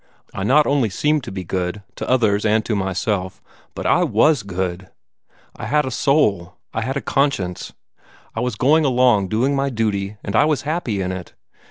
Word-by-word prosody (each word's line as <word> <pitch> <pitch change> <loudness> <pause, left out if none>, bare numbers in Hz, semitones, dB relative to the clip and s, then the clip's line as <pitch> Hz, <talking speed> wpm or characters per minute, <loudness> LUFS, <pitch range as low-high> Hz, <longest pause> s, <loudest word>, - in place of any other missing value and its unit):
I 95 - -4
not 145 +8 +4
only 140 -6 +2
seemed 150 +8 0
to - - -6
be 95 -1 -5
good, 90 +3 -3
to - - -5
others 110 -5 +2
and 110 0 +2
to 110 - -1
myself, 95 0 -2 0.4
but - - -6
I - - +3
was 150 -5 +3
good. 95 -1 -4 0.7
I - - -6
had 150 -1 +2
a 130 - -4
soul; 110 - +1 0.2
I 115 - -1
had 130 +4 -2
a - - -2
conscience. 130 -11 -1 0.6
I - - -4
was 125 -2 -1
going 150 +8 +3
along 125 -7 +3
doing 125 +7 +1
my 140 0 0
duty, 105 -4 -2
and 100 - -4
I - - +5
was 150 -4 0
happy 145 - -2
in 90 - -2
it. 90 -2 -7
110 Hz, 190 wpm, -20 LUFS, 95-140 Hz, 0.7 s, I